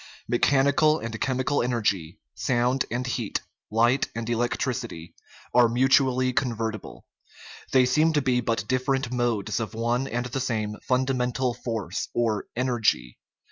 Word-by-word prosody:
Mechanical 140 Hz, +5 st, +3 dB
and 115 Hz, -5 st, -6 dB
chemical 130 Hz, +2 st, 0 dB
energy, 105 Hz, -8 st, -1 dB, 0.2 s
sound 125 Hz, +1 st, +1 dB
and 125 Hz, +2 st, -2 dB
heat, 120 Hz, -4 st, -2 dB, 0.3 s
light 120 Hz, +5 st, +2 dB
and 115 Hz, -1 st, -4 dB
electricity, 120 Hz, -6 st, -2 dB, 0.4 s
are 120 Hz, -1 st, +6 dB
mutually 130 Hz, +1 st, +3 dB
convertible; 115 Hz, -4 st, -3 dB, 0.7 s
they 130 Hz, -1 st, +5 dB
seem 155 Hz, +6 st, +3 dB
to 145 Hz, -, +2 dB
be 125 Hz, -2 st, +2 dB
but 115 Hz, -2 st, -1 dB
different 130 Hz, 0 st, 0 dB
modes 120 Hz, -5 st, 0 dB
of 110 Hz, -1 st, -4 dB
one 120 Hz, +3 st, 0 dB
and 120 Hz, +1 st, -2 dB
the 125 Hz, +2 st, -3 dB
same 110 Hz, -5 st, -2 dB
funda 130 Hz, +1 st, +2 dB
mental 125 Hz, 0 st, 0 dB
force 115 Hz, -5 st, -4 dB
or 110 Hz, -4 st, 0 dB
energy. 120 Hz, -, 0 dB
125 Hz, 135 wpm, -26 LUFS, 115-130 Hz, 0.7 s, are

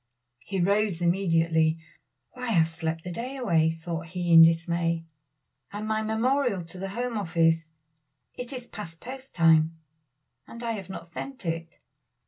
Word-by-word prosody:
He 190 Hz, +7 st, -4 dB
rose 200 Hz, 0 st, +2 dB
immediately. 165 Hz, -3 st, +2 dB, 0.5 s
"Why, 250 Hz, -1 st, -7 dB
I -, -, 0 dB
have 165 Hz, -3 st, +4 dB
slept 165 Hz, 0 st, -3 dB
the 180 Hz, -, -5 dB
day 250 Hz, +8 st, -5 dB
away," 165 Hz, -11 st, +3 dB
thought 165 Hz, 0 st, -5 dB
he 175 Hz, 0 st, -1 dB
in 165 Hz, -, +11 dB
dismay, 165 Hz, 0 st, +3 dB, 0.7 s
"and 210 Hz, +1 st, -5 dB
my 220 Hz, 0 st, 0 dB
memorial 220 Hz, -2 st, +1 dB
to 175 Hz, +2 st, -11 dB
the 195 Hz, +1 st, -4 dB
Home 235 Hz, +2 st, -2 dB
Office; 165 Hz, -3 st, +2 dB, 0.6 s
it 245 Hz, +1 st, -6 dB
is 250 Hz, -3 st, -6 dB
past 170 Hz, -8 st, -9 dB
post 265 Hz, +4 st, -9 dB
time, 165 Hz, -1 st, +4 dB, 0.7 s
and 235 Hz, +1 st, -9 dB
I 230 Hz, -, -1 dB
have 195 Hz, -4 st, -5 dB
not 190 Hz, -, -7 dB
sent 260 Hz, +6 st, -7 dB
it." 165 Hz, 0 st, -4 dB
175 Hz, 155 wpm, -27 LUFS, 165-220 Hz, 0.7 s, in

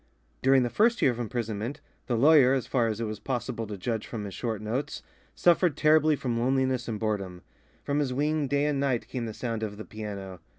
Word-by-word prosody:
During 135 Hz, -1 st, +5 dB
the 120 Hz, -, -2 dB
first 235 Hz, +3 st, +3 dB
year 130 Hz, -, +5 dB
of 120 Hz, -, -6 dB
imprisonment, 115 Hz, +1 st, -3 dB, 0.3 s
the 120 Hz, -, 0 dB
lawyer, 140 Hz, 0 st, +6 dB
as 130 Hz, -, -1 dB
far 120 Hz, -4 st, +1 dB
as 110 Hz, -1 st, -2 dB
it -, -, -1 dB
was 110 Hz, -1 st, -4 dB
possible 120 Hz, -3 st, -3 dB
to 105 Hz, -1 st, -6 dB
judge 110 Hz, +3 st, -3 dB
from 110 Hz, -3 st, -5 dB
his 100 Hz, -, -7 dB
short 115 Hz, -4 st, -3 dB
notes, 115 Hz, +7 st, -3 dB, 0.3 s
suffered 175 Hz, -3 st, +3 dB
terribly 155 Hz, 0 st, +4 dB
from 120 Hz, -4 st, -2 dB
loneliness 130 Hz, 0 st, +1 dB
and 110 Hz, -3 st, -3 dB
boredom. 100 Hz, -5 st, -3 dB, 0.4 s
From 145 Hz, +1 st, 0 dB
his 140 Hz, -3 st, 0 dB
wing 150 Hz, +2 st, 0 dB
day 145 Hz, +1 st, +1 dB
and 150 Hz, -2 st, 0 dB
night 135 Hz, -4 st, 0 dB
came 120 Hz, -3 st, -4 dB
the 110 Hz, -, -5 dB
sound 115 Hz, -3 st, -3 dB
of 105 Hz, -2 st, -4 dB
the 110 Hz, -, -7 dB
piano. 100 Hz, -4 st, -7 dB
120 Hz, 215 wpm, -28 LUFS, 110-140 Hz, 0.4 s, lawyer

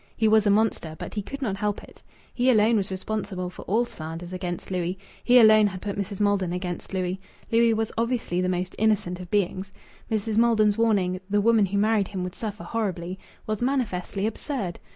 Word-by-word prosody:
He 220 Hz, -, +3 dB
was 215 Hz, -1 st, +4 dB
a -, -, +5 dB
monster, 200 Hz, -6 st, +1 dB
but -, -, -7 dB
he 210 Hz, -, -2 dB
could 275 Hz, +7 st, -6 dB
not 200 Hz, -5 st, -1 dB
help 205 Hz, 0 st, -2 dB
it. -, -, -16 dB, 0.3 s
He 250 Hz, +1 st, +2 dB
alone 225 Hz, -1 st, +4 dB
was 200 Hz, -3 st, 0 dB
responsible 190 Hz, -1 st, -4 dB
for -, -, -10 dB
all 225 Hz, +5 st, +2 dB
slanders 165 Hz, -2 st, -7 dB
against 180 Hz, 0 st, -5 dB
Louis. 180 Hz, 0 st, -1 dB, 0.3 s
He 250 Hz, +1 st, +6 dB
alone 215 Hz, -2 st, +7 dB
had 185 Hz, -2 st, -5 dB
put 200 Hz, +1 st, -4 dB
Mrs. 200 Hz, -1 st, -4 dB
Maldon 200 Hz, -4 st, +1 dB
against 180 Hz, -1 st, -4 dB
Louis. 185 Hz, 0 st, -2 dB, 0.3 s
Louis 230 Hz, 0 st, +4 dB
was 220 Hz, 0 st, -1 dB
obviously 230 Hz, -7 st, 0 dB
the 185 Hz, -, 0 dB
most 180 Hz, 0 st, -2 dB
innocent 205 Hz, -5 st, +1 dB
of 180 Hz, -1 st, -9 dB
beings. 195 Hz, -1 st, -1 dB, 0.4 s
Mrs. 220 Hz, 0 st, -1 dB
Maiden's 220 Hz, -3 st, +4 dB
warning, 195 Hz, -5 st, +1 dB
"The 205 Hz, +1 st, +2 dB
woman 220 Hz, -1 st, +4 dB
who 200 Hz, +2 st, -2 dB
married 210 Hz, -1 st, +2 dB
him 190 Hz, -3 st, -4 dB
would 180 Hz, 0 st, -5 dB
suffer 210 Hz, 0 st, -6 dB
horribly," 190 Hz, -5 st, -3 dB, 0.3 s
was 215 Hz, 0 st, -3 dB
manifestly 215 Hz, -7 st, -1 dB
absurd. 220 Hz, -, -3 dB
205 Hz, 195 wpm, -25 LUFS, 185-220 Hz, 0.4 s, alone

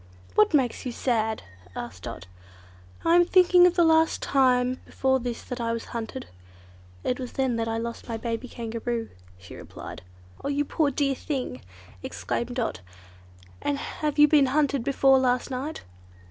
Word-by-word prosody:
"What 215 Hz, +8 st, +4 dB
makes 255 Hz, -5 st, +1 dB
you 250 Hz, -, -3 dB
sad?" 220 Hz, -3 st, -1 dB, 0.3 s
asked 110 Hz, -7 st, -7 dB
Dot. 85 Hz, -, -7 dB, 0.8 s
"I 330 Hz, +1 st, +5 dB
am 350 Hz, -, +7 dB
thinking 360 Hz, 0 st, +6 dB
of 360 Hz, -, 0 dB
the 345 Hz, -, +5 dB
last 320 Hz, 0 st, +4 dB
time 255 Hz, -2 st, +2 dB
before 265 Hz, 0 st, +1 dB
this 240 Hz, -1 st, -4 dB
that 250 Hz, -1 st, -5 dB
I 230 Hz, 0 st, 0 dB
was 230 Hz, -, -4 dB
hunted. 235 Hz, +3 st, -5 dB, 0.8 s
It 250 Hz, -, -1 dB
was 250 Hz, -2 st, -6 dB
then 260 Hz, -3 st, 0 dB
I 225 Hz, 0 st, -1 dB
lost 235 Hz, +1 st, -5 dB
my 225 Hz, -, -2 dB
baby 230 Hz, +2 st, -4 dB
Kangaroo," 230 Hz, 0 st, -4 dB, 0.3 s
she 95 Hz, 0 st, -13 dB
replied. -, -, -9 dB, 0.4 s
"Oh! -, -, -2 dB
you 285 Hz, +1 st, 0 dB
poor 300 Hz, 0 st, +1 dB
dear 280 Hz, 0 st, 0 dB
thing!" 260 Hz, -, -4 dB, 0.4 s
exclaimed 95 Hz, -, -3 dB
Dot, 240 Hz, -, -2 dB, 0.8 s
"and 285 Hz, -, 0 dB
have 300 Hz, +1 st, -3 dB
you 295 Hz, 0 st, +8 dB
been 290 Hz, -2 st, +5 dB
hunted 280 Hz, -2 st, +1 dB
before 270 Hz, 0 st, +4 dB
last 250 Hz, +1 st, +1 dB
night?" 270 Hz, +5 st, -4 dB
255 Hz, 160 wpm, -26 LUFS, 230-285 Hz, 0.8 s, you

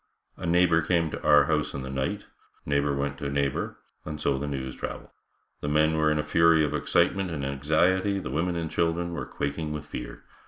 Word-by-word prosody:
A -, -, -5 dB
neighbor 85 Hz, -1 st, +4 dB
came 85 Hz, -1 st, +1 dB
to -, -, -5 dB
our 75 Hz, 0 st, +6 dB
house 75 Hz, -2 st, 0 dB
in 65 Hz, -, -4 dB
the 65 Hz, -, -6 dB
night, 65 Hz, 0 st, -2 dB, 0.4 s
neighbor 70 Hz, 0 st, +1 dB
went 70 Hz, 0 st, -2 dB
to 70 Hz, -, -3 dB
neighbor 70 Hz, -1 st, -1 dB, 0.3 s
and 75 Hz, -1 st, -6 dB
so 70 Hz, -3 st, 0 dB
the 70 Hz, -, -3 dB
news 65 Hz, -2 st, -4 dB
traveled. -, -, -6 dB, 0.5 s
The -, -, -4 dB
men 75 Hz, +2 st, +3 dB
were 80 Hz, 0 st, +3 dB
in 75 Hz, -, +1 dB
a 75 Hz, -, 0 dB
fury 80 Hz, +1 st, +4 dB
of 75 Hz, -1 st, -1 dB
excitement 95 Hz, +4 st, +1 dB
and 75 Hz, -5 st, -3 dB
anxiety, 85 Hz, +8 st, +1 dB
the 90 Hz, -9 st, -5 dB
women 85 Hz, +5 st, 0 dB
and 80 Hz, -1 st, -3 dB
children 85 Hz, +1 st, 0 dB
were -, -, -4 dB
quaking 75 Hz, +2 st, -3 dB
with 75 Hz, -1 st, -5 dB
fear. -, -, -7 dB
75 Hz, 205 wpm, -27 LUFS, 70-85 Hz, 0.5 s, our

